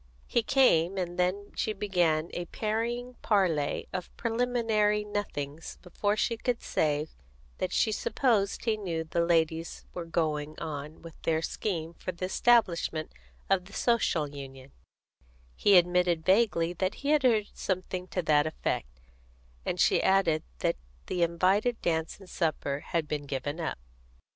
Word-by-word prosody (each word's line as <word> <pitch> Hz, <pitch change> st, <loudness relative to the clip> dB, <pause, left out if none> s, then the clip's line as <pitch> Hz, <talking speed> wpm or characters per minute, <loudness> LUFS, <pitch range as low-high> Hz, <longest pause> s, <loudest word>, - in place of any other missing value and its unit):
He 235 Hz, -, +1 dB
came, 195 Hz, -8 st, +3 dB
and 175 Hz, -1 st, -3 dB
then 190 Hz, +3 st, 0 dB
she 215 Hz, -, -1 dB
began 175 Hz, -6 st, +1 dB
a 175 Hz, -, -3 dB
parrying 235 Hz, +5 st, -2 dB
parley 175 Hz, -9 st, +1 dB
of 180 Hz, -, -4 dB
preliminary 225 Hz, -3 st, +1 dB
nothings 165 Hz, -8 st, -5 dB
before 205 Hz, +3 st, -1 dB
she 230 Hz, +1 st, 0 dB
could 245 Hz, +1 st, -2 dB
say 150 Hz, 0 st, 0 dB, 0.5 s
that -, -, -1 dB
she 220 Hz, -, +2 dB
supposed 215 Hz, -2 st, +1 dB
he 225 Hz, -2 st, +2 dB
knew 170 Hz, -6 st, -3 dB
the 170 Hz, +1 st, 0 dB
ladies 165 Hz, -1 st, 0 dB
were 175 Hz, -, -5 dB
going 155 Hz, -2 st, -1 dB
on 150 Hz, +1 st, -6 dB
with 165 Hz, -2 st, -12 dB
their 160 Hz, 0 st, 0 dB
scheme 165 Hz, -5 st, -3 dB
for 185 Hz, -, -5 dB
the 180 Hz, +1 st, -4 dB
establishment 185 Hz, -7 st, +2 dB, 0.4 s
of 185 Hz, -2 st, +2 dB
the 200 Hz, -, -15 dB
Social 220 Hz, -12 st, +1 dB
Union; 135 Hz, -1 st, -10 dB, 0.8 s
he 200 Hz, -2 st, +6 dB
admitted 175 Hz, -2 st, +3 dB
vaguely 185 Hz, -4 st, +3 dB
that 185 Hz, +2 st, -1 dB
he -, -, +1 dB
had 300 Hz, -1 st, +4 dB
heard 225 Hz, -5 st, +3 dB
something 185 Hz, -1 st, -3 dB
to 180 Hz, -1 st, -2 dB
that 150 Hz, -1 st, +3 dB
effect, 60 Hz, -, -3 dB, 0.7 s
and -, -, -1 dB
she -, -, +4 dB
added 190 Hz, -5 st, +3 dB, 0.2 s
that -, -, +1 dB, 0.3 s
the 180 Hz, -, -2 dB
invited 190 Hz, +8 st, +2 dB
dance 160 Hz, -1 st, 0 dB
and 195 Hz, -, -13 dB
supper 155 Hz, -5 st, -1 dB
had 165 Hz, -3 st, -1 dB
been 145 Hz, -1 st, -3 dB
given 145 Hz, +4 st, -3 dB
up. 160 Hz, -, -2 dB
180 Hz, 150 wpm, -29 LUFS, 160-210 Hz, 0.8 s, he